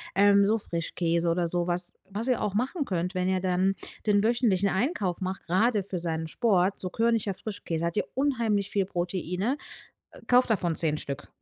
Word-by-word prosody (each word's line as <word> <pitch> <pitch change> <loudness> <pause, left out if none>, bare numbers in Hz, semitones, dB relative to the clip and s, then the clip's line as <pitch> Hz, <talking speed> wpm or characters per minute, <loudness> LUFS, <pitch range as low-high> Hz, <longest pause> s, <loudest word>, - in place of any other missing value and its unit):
ähm, 200 0 +6
so 220 +2 +3
Frischkäse 170 -2 -1
oder 170 0 +1
so 175 0 -1
was. 175 0 -2 0.2
Was 215 +5 -4
ihr 250 - +1
auch 205 -2 -1
machen 265 - -1
könnt, 180 0 -2
wenn 180 0 0
ihr 185 -1 +1
dann 185 +1 +1 0.3
den 205 -1 +3
wöchentlichen 220 -5 +2
Einkauf 195 - -1
macht- 185 0 -4
grade 205 +3 +2
für 185 -2 -4
seinen 160 -1 -2
Sport- 195 -1 +1
so 185 - -4
körniger 225 -2 +1
Frischkäse, 175 -5 -4
hat 170 +5 -2
ja - - +3
unheimlich 230 -8 +1
viel 195 -2 +1
Proteine. 180 - -2 0.7
Kauft 250 0 +4
davon 175 -6 +1
10 155 -2 +1
Stück. 140 0 -4
190 Hz, 180 wpm, -27 LUFS, 175-215 Hz, 0.7 s, ähm